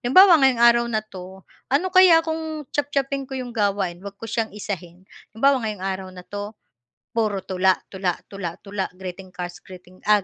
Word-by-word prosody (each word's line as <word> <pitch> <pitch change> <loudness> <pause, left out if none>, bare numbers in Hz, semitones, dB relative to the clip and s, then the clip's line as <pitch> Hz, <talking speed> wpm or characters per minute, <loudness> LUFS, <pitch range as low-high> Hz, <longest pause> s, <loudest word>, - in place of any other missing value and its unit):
halimbawa 370 +8 +8
ngayong 255 -3 +4
araw 235 0 +6
na 220 -2 -1
'to, 190 -2 -11 0.2
ano 285 +8 +1
kaya 365 -3 +7
kung 320 -1 -4
chop-chopin 275 -2 -1
ko 265 - -7
'yong 255 -2 -4
gawain 200 -5 0
huwag 200 0 -8
ko 225 +1 -7
siyang 225 -2 -2
isahin, 185 -4 -6 0.3
halimbawa 270 +2 +3
ngayong 210 -3 -4
araw 190 -1 -3
na 180 - -10
'to. 205 +1 -6 0.6
Puro 215 -4 -1
tula, 185 0 +2 0.2
tula, 185 -2 -1
tula, 180 -4 -6
tula 200 -1 -3
greeting 185 0 -8
cards, 180 -1 -7 0.5
ah, 210 - +7
210 Hz, 170 wpm, -23 LUFS, 190-265 Hz, 0.6 s, halimbawa